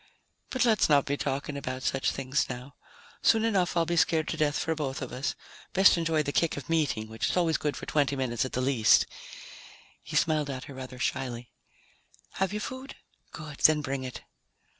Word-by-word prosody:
"But 255 Hz, -2 st, +1 dB
let's 220 Hz, -7 st, +3 dB
not 145 Hz, -2 st, +5 dB
be 145 Hz, -, 0 dB
talking 140 Hz, +1 st, -3 dB
about 130 Hz, -2 st, -4 dB
such 135 Hz, -, +1 dB
things 135 Hz, +1 st, -1 dB
now. 125 Hz, +2 st, -7 dB, 0.5 s
Soon 225 Hz, 0 st, +4 dB
enough 190 Hz, -6 st, +1 dB
I'll 165 Hz, -, +3 dB
be 170 Hz, +1 st, -1 dB
scared 160 Hz, -1 st, +2 dB
to -, -, -2 dB
death 150 Hz, -1 st, +1 dB
for 165 Hz, -, 0 dB
both 140 Hz, -4 st, -3 dB
of 130 Hz, -, -6 dB
us. 130 Hz, +3 st, -2 dB, 0.4 s
Best 190 Hz, +1 st, +6 dB
enjoy 165 Hz, -2 st, +1 dB
the 145 Hz, -, -2 dB
kick 165 Hz, +1 st, +1 dB
of 140 Hz, -, -7 dB
meeting, 145 Hz, -9 st, +1 dB
which 110 Hz, +1 st, -2 dB
is -, -, -1 dB
always 165 Hz, -3 st, +2 dB
good 150 Hz, -1 st, -2 dB
for -, -, -7 dB
twenty 140 Hz, -2 st, +1 dB
minutes 125 Hz, -4 st, -1 dB
at 130 Hz, -, -5 dB
the 125 Hz, -, 0 dB
least." 125 Hz, -4 st, +4 dB, 1.0 s
He -, -, -8 dB
smiled 155 Hz, -3 st, +2 dB
at 130 Hz, -1 st, -4 dB
her 140 Hz, -, -10 dB
rather 130 Hz, -1 st, -8 dB
shyly. 125 Hz, -1 st, -3 dB, 0.9 s
"Have 190 Hz, 0 st, +1 dB
you 210 Hz, -, -2 dB
food? 260 Hz, +5 st, -6 dB, 0.4 s
Good, 150 Hz, -2 st, -9 dB
then 155 Hz, -1 st, +5 dB
bring 135 Hz, -1 st, -3 dB
it." 130 Hz, -1 st, -6 dB
145 Hz, 200 wpm, -28 LUFS, 130-165 Hz, 1.0 s, Best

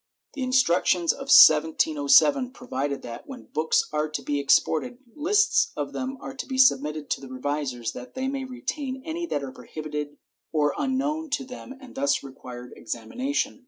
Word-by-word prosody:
* -, -, -56 dB
The 285 Hz, -, -6 dB
instructions 185 Hz, -9 st, +3 dB
of -, -, -9 dB
1707 160 Hz, -, +6 dB
provide 140 Hz, -, -4 dB
that, 115 Hz, 0 st, -8 dB
when 265 Hz, -2 st, -10 dB
books 155 Hz, +1 st, +1 dB
are 150 Hz, 0 st, 0 dB
to 155 Hz, -, -4 dB
be 145 Hz, -1 st, -1 dB
exported, 160 Hz, -, +2 dB, 0.2 s
fists 420 Hz, +9 st, +2 dB
of -, -, -3 dB
them 265 Hz, +1 st, -4 dB
are 270 Hz, -, -7 dB
to -, -, -5 dB
be 265 Hz, -, -4 dB
submitted 150 Hz, -, +3 dB
to -, -, -1 dB
the 135 Hz, -, -9 dB
revisers 130 Hz, -3 st, -3 dB
that 125 Hz, 0 st, -10 dB
they 260 Hz, 0 st, -2 dB
may 270 Hz, 0 st, -3 dB
retain 260 Hz, +1 st, -5 dB
any 340 Hz, +2 st, -3 dB
that 145 Hz, -, -2 dB
are 135 Hz, -, -6 dB
prohibited 150 Hz, +3 st, -6 dB, 0.3 s
or 150 Hz, -2 st, +1 dB
are 295 Hz, -, -2 dB
unknown 295 Hz, +4 st, -1 dB
to 270 Hz, -3 st, -1 dB
them 255 Hz, +1 st, -9 dB
and 260 Hz, -2 st, -13 dB
thus 280 Hz, +1 st, 0 dB
require 125 Hz, -2 st, -10 dB
examination. 250 Hz, -, -3 dB
175 Hz, 175 wpm, -25 LUFS, -, 0.3 s, 1707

